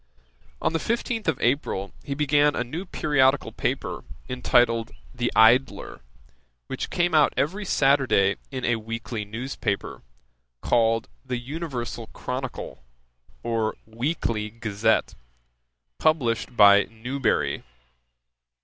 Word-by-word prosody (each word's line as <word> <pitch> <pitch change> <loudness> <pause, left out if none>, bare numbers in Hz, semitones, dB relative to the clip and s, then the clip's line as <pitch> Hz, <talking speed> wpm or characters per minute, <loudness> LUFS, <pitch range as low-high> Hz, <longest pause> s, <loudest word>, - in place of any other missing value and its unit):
"' - - -33
On - - +1
the 165 - +1
fifteenth 230 +2 -2
of 160 -5 +1
April 120 -7 0
he 140 -2 -4
began 145 0 +3
a - - 0
new 160 +10 -6
periodical 145 -4 +2
paper, - - -3 0.2
entitled 120 -2 +2 0.2
The 120 0 -1
Idler,[*] 115 - +3 0.6
which - - -4
came 175 -1 0
out 155 -2 +4
every 190 +9 -1
Saturday 135 - +3
in 130 -2 -4
a 120 -1 +2
weekly 115 0 -5
news 120 +6 -6
paper, 100 -3 -3 0.6
called 115 - +2 0.2
The 130 -2 -3
Universal 125 -4 -5
Chronicle, 125 - -5 0.6
or 115 -2 -1
Weekly 115 -2 -2
Gazette, 110 0 0 0.9
published 125 -6 +1
by 100 0 +7
Newbery. 125 +4 -1
120 Hz, 115 wpm, -25 LUFS, 110-145 Hz, 0.9 s, by